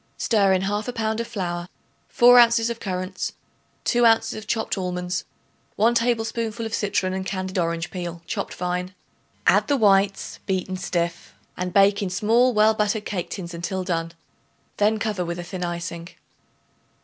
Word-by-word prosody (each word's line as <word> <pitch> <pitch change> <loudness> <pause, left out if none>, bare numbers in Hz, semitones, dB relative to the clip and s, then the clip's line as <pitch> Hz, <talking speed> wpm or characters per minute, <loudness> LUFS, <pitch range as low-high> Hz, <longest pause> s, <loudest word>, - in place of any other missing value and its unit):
Stir 200 -4 +3
in 190 0 +2
1/2 210 +5 -2
pound 220 0 -1
of 235 - -3
flour, 175 -5 -4 0.4
4 245 -1 +7
ounces 235 -1 +5
of 230 - -6
currants, 185 -1 -4 0.5
2 240 -1 +2
ounces 225 -1 +4
of 215 -1 -8
chopped 225 - -1
almonds, 180 -1 -3 0.5
1 225 +3 +3
tablespoonful 230 -1 -1
of 225 - -5
citron 195 -3 0
and 190 0 -2
candied 185 0 -3
orange 170 0 -1
peel 175 -2 -6
chopped - - -4
fine. 180 +1 -3 0.5
Add - - +4
the 285 - +2
whites 195 -3 +2
beaten 185 0 -1
stiff 170 -2 -3 0.2
and 180 0 -3
bake 200 +2 +4
in 195 - -1
small 225 +7 +3
well 215 -1 +4
buttered 210 0 -1
cake 180 -4 -3
tins 175 -3 -6
until 185 +2 -3
done; 165 -2 -2 0.6
then 210 +1 +3
cover 210 -3 -2
with 170 0 -4
a 175 - -5
thin 180 +1 -6
icing. 170 -1 -4
195 Hz, 160 wpm, -23 LUFS, 180-220 Hz, 0.6 s, 4